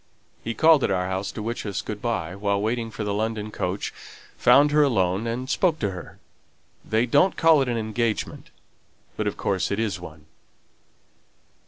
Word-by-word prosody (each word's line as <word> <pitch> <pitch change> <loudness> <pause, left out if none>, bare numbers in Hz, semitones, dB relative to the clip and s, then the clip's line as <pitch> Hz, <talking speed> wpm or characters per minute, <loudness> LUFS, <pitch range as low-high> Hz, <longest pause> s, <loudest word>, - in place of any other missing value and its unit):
He 115 0 -3
called 160 +1 +5
at - - +1
our 90 -2 0
house 95 +1 -3
to 110 - -6
wish 115 +2 -3
us 100 -3 -3
good 105 -1 -6
by, 90 -8 -2
while 100 0 0
waiting 115 +2 -1
for 110 -1 -5
the 105 -1 -2
London 110 0 -2
coach, 90 -1 -3 0.4
found 140 +4 +5
her 150 0 +4
alone, 100 -6 +1
and 125 +3 -3
spoke 165 +3 +1
to 100 -7 -1
her. 90 -2 -9 0.7
They 110 +2 +1
don't 180 +10 +3
call 165 -3 +5
it 130 - 0
an 120 - -1
engagement, 110 0 -2 0.7
but - - -2
of - - -3
course 95 -2 -1
it 100 - -1
is 110 -4 -1
one." 80 -3 -11
110 Hz, 180 wpm, -24 LUFS, 100-120 Hz, 0.7 s, called